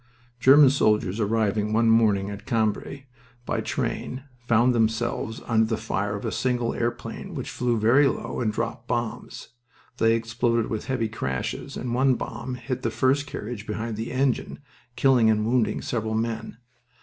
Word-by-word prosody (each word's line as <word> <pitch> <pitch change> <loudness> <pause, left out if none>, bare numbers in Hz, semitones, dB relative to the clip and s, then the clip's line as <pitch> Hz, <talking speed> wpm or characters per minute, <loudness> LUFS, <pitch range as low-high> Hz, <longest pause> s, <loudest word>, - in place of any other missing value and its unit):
German 135 +2 +7
soldiers 105 -6 +1
arriving 105 -1 0
one 115 +1 +3
morning 105 -3 +3
at 100 +2 -9
Cambrai 115 +4 -1 0.4
by - - -1
train 130 +1 -3 0.2
found 120 +2 +4
themselves 115 0 -1
under 110 -1 +2
the 110 -1 -1
fire 100 +1 -2
of 100 - -6
a - - -1
single 125 -2 0
airplane 120 0 -4
which - - -5
flew 120 -2 0
very 120 +7 +5
low - - -3
and 110 -3 0
dropped 115 +1 -4
bombs. 120 -2 -4 0.5
They 115 0 +4
exploded 115 0 0
with 110 - -3
heavy 125 -4 -1
crashes, 65 - -4
and 120 -1 -3
one 130 +1 +3
bomb 125 +1 -5
hit 130 0 -4
the 115 - 0
first 135 +5 +1
carriage 110 -4 -6
behind 110 +1 -3
the 110 +2 -4
engine, 130 -1 0 0.4
killing 125 -3 +4
and 105 -1 +2
wounding 120 -1 +1
several 110 -2 -2
men. 115 0 -3
115 Hz, 160 wpm, -25 LUFS, 110-125 Hz, 0.5 s, German